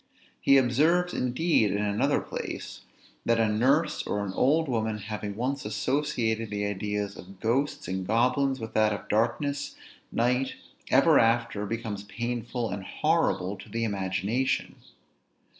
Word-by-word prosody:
He 140 - +5
observes 155 +8 +3
indeed 125 -2 +2
in 100 - 0
another 105 0 +1
place, - - -6 0.4
that 115 0 +2
a 115 - +3
nurse 135 +9 +2
or 105 0 -1
an 95 - -5
old 150 +8 +3
woman 110 -4 -1
having 105 -1 -5
once 130 +5 -2
associated 115 -1 -1
the 105 0 -2
ideas 105 0 -3
of 95 +1 -12
ghosts 125 +4 0
and 95 0 -3
goblins 130 +4 +2
with 110 -1 -6
that 110 -1 +3
of 100 - -7
darkness, 140 +6 0 0.4
night, 125 +3 +1 0.3
ever - - +6
after, 115 -2 +1
becomes 110 -2 -4
painful 120 +1 -3
and 100 - -4
horrible 150 - 0
to - - -12
the 115 0 -2
imagination. 100 +4 -1
115 Hz, 140 wpm, -27 LUFS, 105-130 Hz, 0.4 s, ever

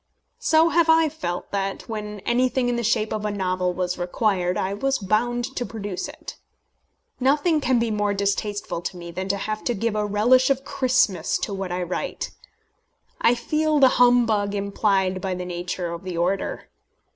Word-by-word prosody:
So 320 +1 +4
have 335 -1 +3
I 320 -1 +5
felt 230 - -5
that, 195 -1 -3
when 210 -2 -5
anything 250 +2 +1
in 245 - 0
the 235 - -1
shape 220 -1 +1
of 215 - -3
a 210 - 0
novel 185 -2 -1
was 180 0 -2
required, 180 0 0
I 190 +1 -1
was 270 +6 0
bound 240 +5 -1
to 245 - -1
produce 205 -5 -5
it. - - -10 0.8
Nothing 295 +4 +2
can 255 -2 +2
be 230 -1 0
more 205 -1 0
distasteful 200 -2 -2
to 180 - -5
me 170 -1 -8
than 185 +2 -4
to 200 +1 0
have 215 +2 -4
to 240 - 0
give 225 +1 -1
a 210 - +1
relish 235 +6 +3
of 270 0 0
Christmas 235 -12 +1
to 205 - -2
what 190 -2 -4
I 180 0 -1
write. 175 +1 -4 0.9
I 240 - +5
feel 305 +5 0
the 270 -2 +7
humbug 230 -5 +4
implied 195 -2 0
by 190 -2 -2
the 180 0 -5
nature 175 0 -4
of 170 - -6
the 185 -2 -5
order. 180 +3 -2
210 Hz, 180 wpm, -24 LUFS, 185-245 Hz, 0.9 s, the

